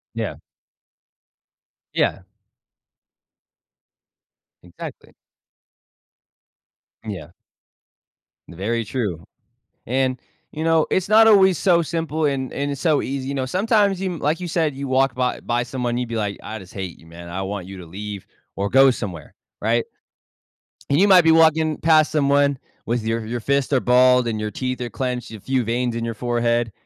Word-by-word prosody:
Yeah. - - -3 1.6
Yeah. 95 - 0 2.4
Exactly. 85 0 -10 1.9
Yeah. 90 -7 -7 1.2
Very 110 +7 -2
true, 105 -8 -3 0.6
and, 130 +1 0 0.3
you 155 - -5
know, 165 -1 +3
it's 190 +1 0
not 220 +1 +7
always 190 -5 +6
so 175 -3 +3
simple 160 -1 -2
and 135 -2 -2
and 140 +1 -2
it's 140 -2 -5
so 155 -4 +2
easy, 135 0 -4
you 140 - -3
know, 130 -1 -2
sometimes 200 - +2
you, 185 -3 -3
like 150 +3 0
you 180 - -5
said, 160 -4 0
you 140 +1 -4
walk 130 -1 +2
by 125 -1 -1
by 120 0 -1
someone, 120 -1 -2
you'd 125 -1 -3
be, 115 - -5
like, 105 -2 -2
"I 110 - -6
just 95 -1 -14
hate 95 -3 -6
you, 80 - -19
man. 85 +1 -11
I 90 +3 -4
want 95 -1 -5
you 95 0 -9
to 90 - -10
leave 100 +2 -7 0.3
or 100 +1 -2
go 135 +3 +6
somewhere," 90 -10 -7 0.3
right? 115 +2 +1 1.1
And 140 +2 +3
you 200 - +5
might 185 -2 +8
be 160 - +5
walking 160 -1 +4
past 155 -1 +4
someone 140 -2 +2 0.3
with 120 -1 -1
your 115 0 -1
your 120 +2 -3
fists 140 +4 0
are 135 - +4
balled 125 0 +4
and 110 -2 -2
your 105 0 -3
teeth 125 +3 -3
are 120 - -3
clenched, 125 -2 -4
a 110 - -8
few 130 +3 -1
veins 120 +1 -1
in 115 - -3
your 115 0 -3
forehead, 120 0 0
125 Hz, 160 wpm, -22 LUFS, 110-155 Hz, 2.4 s, might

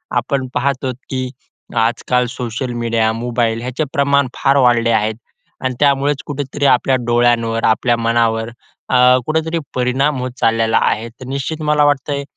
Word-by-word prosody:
आपण 135 -3 -1
पाहत 135 +1 -1
आहोत 130 -2 -2
की 130 -1 -3 0.5
आजकाल 125 +2 +1
सोशल 125 0 -4
मीडिया, 115 -1 +1
मोबाईल 115 -1 -1
ह्याचे 130 +5 -3
प्रमाण 140 -1 +2
फार 140 0 +2
वाढले 115 -1 +3
आहेत. 110 0 +1 0.5
आणि 130 -1 -1
त्यामुळेच 140 0 +2
कुठेतरी 145 0 -3
आपल्या 130 0 +3
डोळ्यांवर, 120 -1 +1
आपल्या 120 +2 +2
मनावर 115 -1 +1 0.4
अ, 130 - +1 0.3
कुठेतरी 160 +1 -1 0.2
परिणाम 130 +3 +1
होत 130 0 -3
चाललेला 115 0 +2
आहे. 110 +2 0
तर 130 +3 -13
निश्चित 140 +4 -4
मला 150 -1 +3
वाटतंय 140 0 0
125 Hz, 145 wpm, -17 LUFS, 115-140 Hz, 0.5 s, वाढले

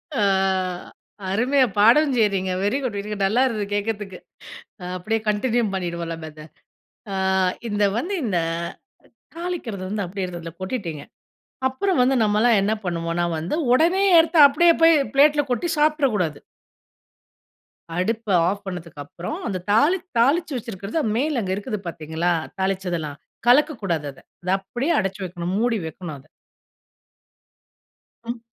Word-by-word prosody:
அ, 220 - +1 1.1
அருமையா 255 +6 +3
பாடவும் 255 +7 +5
செய்றீங்க. 195 -4 +1
Very 205 +7 +1
good 220 -5 -2
very 210 +1 -6
good. 200 -2 0
நல்லாயிருந்தது 225 -1 +1
கேக்கிறதுக்கு. 205 -2 -3 0.7
அ, - - -6
அப்டியே 220 +5 -1
கன்டினியூ 235 +3 +1
பண்ணிடுவோம் 170 -2 -3
நம்ம 160 -1 -8
இத 155 0 -12 0.7
அ - - -2 0.5
இந்த 205 -1 +1
வந்து 370 +10 -2
இந்த 190 -6 0 1.0
தாளிக்கிறது 335 - -4
வந்து, 205 0 -2
அப்படியே 185 +1 -4
அதுல 165 0 -8
கொட்டிட்டீங்க. 185 - -4 0.7
அப்புறம் 285 +6 -1
வந்து 260 +2 +3
நம்மலாம் 215 +1 +3
என்ன 205 +2 +1
பண்ணுவோன்னா 170 0 -1
வந்து, 165 - -3 0.2
ஒடனே 345 +8 +3
எடுத்து 325 +1 +3
அப்டியே 335 +4 +4
போய் 330 0 +7 0.2
பிளேட்ல 290 +1 +5
கொட்டி 245 +8 0
சாப்ட்ரக் 300 -5 +2
கூடாது! 160 -7 -2 1.6
அடுப்ப 220 +4 -2 0.2
ஆஃப் 200 +1 -2
பண்ணதுக்கப்புறம் 175 - -6
அந்த 185 -2 -2
தாளி 290 - +4 0.2
தாளிச்சு 290 +5 +2
வச்சிருக்கறது 220 - -4
மேல 280 +2 0
அங்கு 190 -2 -2
இருக்குது 205 +1 -4
பார்த்தீர்களா, 160 +1 -2 0.3
தாளிச்சது 190 -2 -1
எல்லாம் 150 -2 -6 0.3
கலக்கக்கூடாது 225 - +2
அத. 135 - -18 0.2
அத 180 - -4
அப்படியே 245 - -2
அடைச்சு 195 0 -3
வைக்கணும். 175 0 -4
மூடி 235 -1 +1
வைக்கணும் 160 -1 -7
அதை. 135 - -21 2.0
ம். 235 +1 -5
210 Hz, 130 wpm, -23 LUFS, 180-260 Hz, 2.0 s, போய்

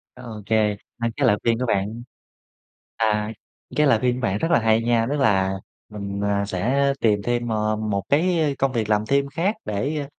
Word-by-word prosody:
OK, 115 -5 -9 0.5
2 115 0 0
cái - - +3
lời 105 - +4
khuyên 115 0 +1
của 125 - 0
bạn 110 +1 -1 0.9
à, 105 -1 0 0.5
cái 150 0 +4
lời 130 -5 +4
khuyên 125 +1 +1
của 125 - -5
bạn 95 +1 0
rất 165 - -1
là 170 - +4
hay 110 0 +3
nha. 115 -1 +2
Tức 145 - 0
là 95 -5 +2 0.4
mình, 100 -1 -5
ờ, 100 0 +1
sẽ 130 +9 +1
tìm 105 -3 +2
thêm 120 +1 -1
m - - -1 0.4
một 100 -1 0
cái, 170 +4 +2
ơ, 155 - +2
công 135 -1 +1
việc 110 -3 -1
làm 105 0 +1
thêm 140 +2 +2
khác 170 +9 -1
để, 140 +9 -2
115 Hz, 200 wpm, -23 LUFS, 105-135 Hz, 0.9 s, lời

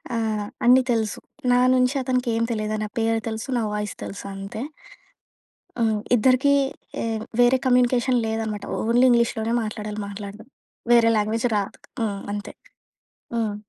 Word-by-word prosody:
ఆహ్, 220 -2 -1 0.2
అన్ని 255 +2 +7
తెలుసు. 220 -2 -1 0.3
నా 245 - +5
నుంచి 255 +2 +2
అతనికి 250 -1 0
ఏం 230 - +1
తెలీదు. 215 -1 -2
నా 215 - -2
పేరు 225 0 +1
తెలుసు, 220 +2 -4
నా 235 - 0
వాయిస్ 210 0 -3
తెలుసు 200 - -7
అంతే. 195 +4 -6 1.2
హ్మ్. 220 -2 +2 0.2
ఇద్దరికీ 260 +5 +4 0.5
ఎ - - -1 0.4
వేరే 245 +2 +5
కమ్యూనికేషన్ 250 0 +3
లేదనమాట, 220 -2 -3 0.2
ఓన్లీ 240 +3 +4
ఇంగ్లీష్‌లోనే 235 -1 +2
మాట్లాడాలి 215 0 -5
మాట్లాడడం, 205 +2 -8 0.5
వేరే 230 -1 +6
లాంగ్వేజ్ 225 +3 0
రాదు. 200 -1 -4 0.2
హ్మ్. 205 -3 -1
అంతే. 205 0 -6 0.8
హ్మ్. 220 -3 -1
225 Hz, 135 wpm, -23 LUFS, 210-245 Hz, 1.2 s, అన్ని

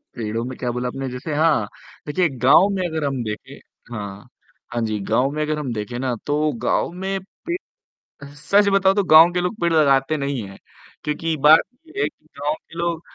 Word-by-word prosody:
पेड़ों 115 0 -3
में 130 0 -6
क्या 125 - -2
बोला 125 +1 -2
आपने 135 +1 -4
जैसे 125 +5 -5
हाँ, 150 -9 +2 0.4
देखिए 175 +4 +1
गाँव 135 +10 +6
में 185 -2 -1
अगर 160 -2 -3
हम 135 -3 -1
देखें 105 -1 -7 0.3
हाँ, 105 +1 -7 0.4
हाँ 120 - -1
जी, 110 -1 -1
गाँव 125 +7 +1
में 150 +1 -2
अगर 150 0 -1
हम 135 -5 -3
देखें 110 +2 -4
ना 130 -1 -1
तो 150 +1 +1
गाँव - - +1
में 195 0 -1 0.3
पेड़ 345 +1 -1 0.8
सच 200 +8 +3
बताऊँ 195 0 +4
तो 205 - +2
गाँव 165 +2 +9
के 180 - 0
लोग 180 +5 -2
पेड़ 170 -1 +2
लगाते 140 -1 +3
नहीं 140 -3 -2
हैं 95 - -12 0.5
क्योंकि 160 +2 -1
बात 155 +1 +9 0.3
ये 385 +5 -5
है - - +2
कि - - -38
गाँव 145 +1 0
के 165 - -16
लोग 170 -1 -1
150 Hz, 200 wpm, -21 LUFS, 125-165 Hz, 0.8 s, गाँव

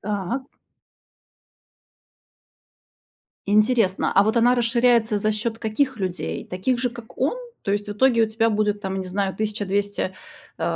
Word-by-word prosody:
Так. 210 +6 -3 3.0
Интересно, 210 -1 +2
а 195 - +7
вот 220 +3 0
она 240 +2 +5
расширяется 235 -2 +2
за 215 +1 +1
счёт 225 +1 -3
каких 245 +4 0
людей? 175 - -3
Таких 215 +8 -1
же, 250 -1 0
как 235 -1 -12
он? 275 - +1 0.3
То 200 - -1
есть 205 0 -2
в - - -2
итоге 230 +2 +3
у - - +4
тебя 225 +1 +1
будет, 210 -1 0
там, 190 -1 -3
не - - -4
знаю, 195 +1 -1
1200 205 -2 -2 0.4
э, - - -5
215 Hz, 145 wpm, -23 LUFS, 200-235 Hz, 3.0 s, а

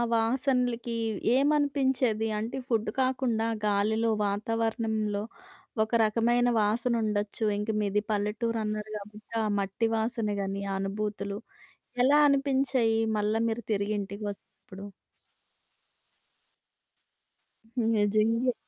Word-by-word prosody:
వాసనలకి 245 0 0 0.4
ఏమనిపించేది? 270 -5 +2
అంటే 230 +4 -4
ఫుడ్ 225 -3 0
కాకుండా 255 -3 0 0.2
గాలిలో, 220 +3 +2 0.2
వాతావరణంలో 220 0 -1 0.6
ఒక 220 - -7
రకమైన 240 +3 +2
వాసనుండొచ్చు. 215 -1 0 0.2
ఇంక 210 +2 -3
మీది 205 0 +1
పల్లెటూరన్నారు 215 0 -2
కాబట్టి 210 +2 -12
ఆ - - 0
మట్టి 200 +4 -1
వాసన 225 -1 -1
గానీ, 195 0 -3
ఆ - - -1
అనుభూతులు 200 0 -3 0.6
ఎలా 290 +3 +5
అనిపించాయి, 270 -5 +2 0.2
మళ్ళా 210 +1 +1
మీరు 230 +1 -3
తిరిగి 205 +1 -1
ఇంటికి 200 +2 -6
వచ్చినప్పుడు? 195 0 -13 2.9
హ్మ్. 235 -3 0
నిజంగే. 215 +4 +2
220 Hz, 95 wpm, -28 LUFS, 210-240 Hz, 2.9 s, ఎలా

